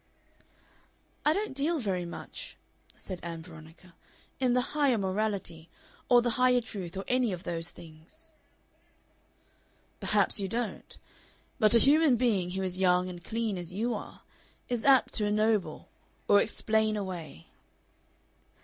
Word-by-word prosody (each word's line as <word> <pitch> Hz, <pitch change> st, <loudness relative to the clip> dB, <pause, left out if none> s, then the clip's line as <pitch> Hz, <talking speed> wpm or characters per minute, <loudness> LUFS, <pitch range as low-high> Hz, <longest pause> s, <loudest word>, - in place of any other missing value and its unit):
"I 300 Hz, -, +4 dB
don't 405 Hz, -1 st, -2 dB
deal 295 Hz, +5 st, 0 dB
very 190 Hz, -, -2 dB
much," 170 Hz, -, -9 dB, 0.4 s
said 185 Hz, -3 st, -6 dB
Ann 165 Hz, -1 st, -6 dB
Veronica, 165 Hz, +1 st, -14 dB, 0.5 s
"in 255 Hz, -2 st, +2 dB
the 250 Hz, +1 st, 0 dB
Higher 280 Hz, -5 st, +3 dB
Morality, 190 Hz, -4 st, -3 dB, 0.4 s
or 245 Hz, -1 st, +6 dB
the 240 Hz, -, +1 dB
Higher 250 Hz, -1 st, +5 dB
Truth, 195 Hz, -7 st, -7 dB
or 195 Hz, -, -5 dB
any 250 Hz, -3 st, +1 dB
of 180 Hz, -1 st, -6 dB
those 165 Hz, 0 st, -3 dB
things." 160 Hz, 0 st, -13 dB, 1.7 s
"Perhaps -, -, +2 dB
you 195 Hz, -, -2 dB
don't. 230 Hz, +2 st, -4 dB, 0.6 s
But 215 Hz, 0 st, +6 dB
a -, -, +9 dB
human 290 Hz, +2 st, +5 dB
being 215 Hz, -7 st, +1 dB
who 190 Hz, +1 st, -3 dB
is 185 Hz, 0 st, -2 dB
young 180 Hz, -1 st, +3 dB
and 175 Hz, -1 st, -9 dB
clean, 220 Hz, -4 st, -2 dB
as 175 Hz, 0 st, -8 dB
you 230 Hz, +5 st, -1 dB
are, 210 Hz, -, -8 dB, 0.5 s
is 245 Hz, -2 st, -1 dB
apt 270 Hz, -2 st, +5 dB
to 210 Hz, -, +1 dB
ennoble 215 Hz, -1 st, 0 dB, 0.4 s
or 205 Hz, 0 st, +6 dB
explain 220 Hz, -1 st, 0 dB
away." 175 Hz, -, -7 dB
205 Hz, 140 wpm, -29 LUFS, 180-245 Hz, 1.7 s, a